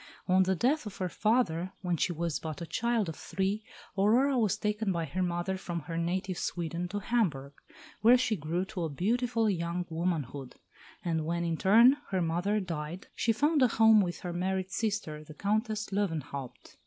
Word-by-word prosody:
On 185 0 +5
the 190 0 +2
death 260 - +1
of 205 - -8
her 185 -1 -2
father, 190 -4 +1
when 180 -1 +1
she 170 - 0
was 170 -1 -2
but 155 -2 -6
a 170 - -5
child 235 +2 0
of 160 - -5
three, 195 +3 -2 0.3
Aurora 235 +8 +3
was 215 -4 +2
taken 210 -1 -1
by 170 -2 -1
her 185 +3 -3
mother 175 +1 -1
from 175 -2 -4
her 165 +3 -6
native 180 +2 -1
Sweden 170 0 -3
to 200 +3 -4
Hamburg, 180 - 0 0.5
where 240 +3 +7
she 245 -3 +1
grew 170 +2 -2
to 180 -5 -3
beautiful 230 - 0
young 175 -2 -1
womanhood; 155 -6 -3 0.5
and 165 -2 0
when, 170 +2 -1
in 165 -1 0
turn, 230 - +6
her 190 - 0
mother 175 +6 0
died, 170 -1 -5
she 230 - +1
found 295 +6 +2
a 255 - +7
home 220 -2 +6
with 175 -2 -3
her 175 -1 -4
married 185 +1 -1
sister, 200 -10 -2
the 155 0 -12
Countess 215 +2 0
Löwenhaupt. 155 -10 -4
185 Hz, 180 wpm, -30 LUFS, 170-215 Hz, 0.5 s, where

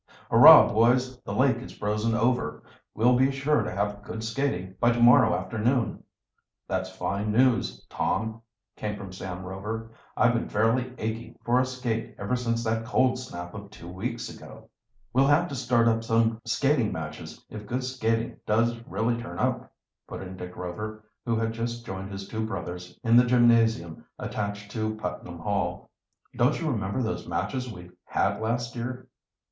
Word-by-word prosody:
"Hurrah, - - +10
boys, 125 +3 +3
the - - -7
lake 130 -3 +3
is 125 - -9
frozen 105 +2 0
over! 125 +2 0 0.3
We'll 125 +3 +4
be 130 +2 +4
sure 140 0 +1
to 105 - -3
have 105 +1 -2
good 110 +2 -6
skating 110 -6 -2
by 120 0 +4
to 120 - -2
morrow 120 -3 +6
afternoon!" 115 +6 -1 0.6
"That's 95 0 -2
fine 100 +2 -2
news, 125 +2 +2
Tom," 110 0 -2 0.3
came 105 -1 -4
from 100 -2 -8
Sam 95 0 -6
Rover. 105 +4 -5 0.3
"I've 120 -1 +4
been 115 - -1
fairly 115 +4 +1
aching 115 +2 -5
for 120 +2 +3
a 130 - +3
skate 125 -3 -3
ever 125 - -1
since 115 -2 -1
that 115 0 0
cold 125 +2 +2
snap 90 -9 -7
of 100 0 -9
two 85 - -12
weeks 115 +7 -4
ago." - - -12 0.4
"We'll 135 +2 +4
have 150 +5 +4
to 140 - -5
start 120 -2 +2
up 115 0 +2
some 115 0 +1
skating 120 0 +2
matches 75 -2 -7
if 105 -1 -8
good 125 +4 -2
skating 115 -3 -1
does 115 +2 +1
really 115 +1 -1
turn 115 - -7
up," - - -1 0.4
put - - -7
in 95 0 -8
Dick 90 -1 -8
Rover, 105 +5 -6 0.2
who 115 - +2
had 115 0 -1
just 120 +1 -4
joined 95 +1 -6
his 95 0 -6
two 110 +1 -3
brothers 90 -3 -6
in 115 -1 +4
the 125 - +8
gymnasium 115 -8 +3
attached 100 0 -4
to 110 -1 -2
Putnam 90 -3 -6
Hall. 90 -1 -2 0.4
"Don't 125 +4 +2
you 160 -3 -1
remember 100 +1 -1
those 110 - -3
matches 125 -2 -2
we 90 -3 -11
had 100 +1 0
last 120 +2 -2
year?" 125 +2 -5
115 Hz, 170 wpm, -27 LUFS, 100-120 Hz, 0.6 s, Hurrah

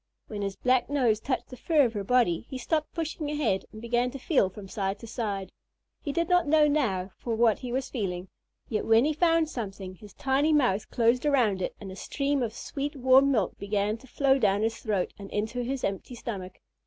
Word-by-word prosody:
When 210 -2 -6
his 195 -1 -2
black 255 +1 +2
nose 250 -7 +2
touched 255 +3 -3
the 255 - -8
fur 300 +1 +3
of 230 - -2
her 205 -2 -3
body, 230 -4 +2
he 265 - -5
stopped 305 +4 -1
pushing 320 -2 -3
ahead 265 -11 0
and 215 - -10
began 240 +2 0
to 275 - -7
feel 260 - +2
from 195 +1 -10
side 195 -1 -2
to 230 - -11
side. 210 -4 -3 0.5
He 285 - -3
did 335 +3 0
not 355 -2 +3
know 305 0 +5
now 205 -11 0
for 230 -2 -2
what 225 -2 +3
he 250 - -6
was 260 +1 -2
feeling, 185 -6 -3 0.4
yet 215 - -2
when 225 +3 +5
he 310 - +1
found 330 0 +3
something 195 -8 -6
his 200 +1 -14
tiny 280 +4 +2
mouth 245 -9 +2
closed 235 +1 +2
around 245 -10 +2
it - - -3
and 195 -2 -8
a - - -8
stream 280 +7 -1
of 230 -2 -2
sweet 285 +1 -4
warm 265 +1 +5
milk 215 -9 0
began 205 +1 0
to 265 - -16
flow 270 +1 +2
down 205 -2 +2
his 225 0 0
throat 205 -5 -1
and 200 -1 -8
into 220 +4 -2
his 260 +2 -3
empty 200 +5 -3
stomach. 195 -6 -6
240 Hz, 215 wpm, -28 LUFS, 205-275 Hz, 0.5 s, know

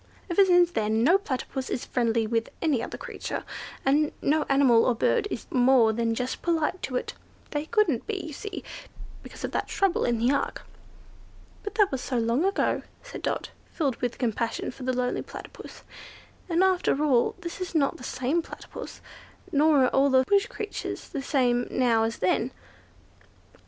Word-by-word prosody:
Ever 390 +3 +6
since 355 -2 +5
then 220 -3 +1
no 345 +9 +5
Platypus 265 -5 -4
is - - -3
friendly 230 -2 +1
with 230 +1 -1
any 295 -8 +1
other - - -5
creature, - - -5 0.4
and 295 +3 +3
no 305 +2 +1
animal 270 -4 +5
or 250 - +2
bird 410 - +1
is 240 - -5
more 250 -3 +5
than 230 0 0
just 250 +2 -3
polite 335 +1 0
to 255 - -4
it. - - -2 0.4
They 295 0 -2
couldn't 395 - +1
be, 430 -2 -2
you 315 - -7
see, 405 +6 -6 0.6
because - - -11
of - - -2
that - - -2
trouble 390 -2 +1
in 240 -1 +1
the 240 +4 +2
ark." - - -2 1.0
"But 410 -1 -6
that 410 -2 +4
was 265 -2 -2
so 255 - -2
long 235 +8 +1
ago," 390 - +1 0.2
said - - -8
Dot, - - -2 0.2
filled 275 -7 -1
with 245 -1 -3
compassion 230 -1 -2
for 265 - -14
the 255 0 0
lonely 250 0 0
Platypus; - - -10 0.7
"and, 340 +2 +3
after 365 -6 +2
all, 260 -6 +3
this 345 +2 -6
is 360 -2 -5
not 280 -3 +2
the - - -12
same 260 +7 0
Platypus, - - -9 0.5
nor 295 -1 +4
are - - +2
all 275 +3 +3
the 260 -1 +5
bush 400 +4 +3
creatures 425 - -5
the 280 - -4
same 245 -4 +1
now 230 -3 +2
as 225 0 -3
then." 225 +7 +1
270 Hz, 175 wpm, -27 LUFS, 240-340 Hz, 1.0 s, Ever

